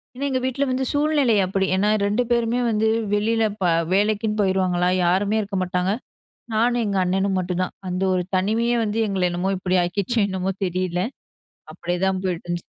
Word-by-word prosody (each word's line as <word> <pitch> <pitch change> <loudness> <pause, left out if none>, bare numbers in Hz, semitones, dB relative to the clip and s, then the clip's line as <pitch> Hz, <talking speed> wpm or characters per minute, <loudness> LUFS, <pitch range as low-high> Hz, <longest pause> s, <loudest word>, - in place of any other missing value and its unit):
ஏன்னா 275 +3 -3
எங்க 260 -1 0
வீட்ல 260 +2 0
வந்து 260 +1 0
சூழ்நிலை 290 -5 +2
அப்டி. 190 +1 0
ஏன்னா 200 +2 +2 0.2
2 210 +5 +1
பேருமே 235 0 +1
வந்து 220 0 +1 0.3
வெளில 225 +2 +1 0.2
ப - - 0 0.3
வேலைக்குன்னு 210 +2 +1
போயிருவாங்களா? 185 -2 +1 0.2
யாருமே 200 +5 +2
இருக்க 200 -1 -4
மாட்டாங்க. 180 +1 -1 0.6
நானும் 240 +2 +2
எங்க 200 -1 -1
அண்ணனும் 190 +1 0
மட்டும்தான். 180 0 -2 0.2
அந்த 180 +1 -2
ஒரு 180 -1 0
தனிமையே 225 +6 +1 0.3
எங்கள 190 -2 0
என்னமோ 175 +2 -1
இப்டி 185 0 +1
ஆக்கிச்சு 200 +6 -1
என்னமோ 190 0 -2
தெரில. 180 -1 -1 0.7
அப்டியேதான் 180 +3 -1
போயிட்டு 180 -3 -3
இருந்துச்சு. 175 0 -3
195 Hz, 155 wpm, -22 LUFS, 185-225 Hz, 0.7 s, சூழ்நிலை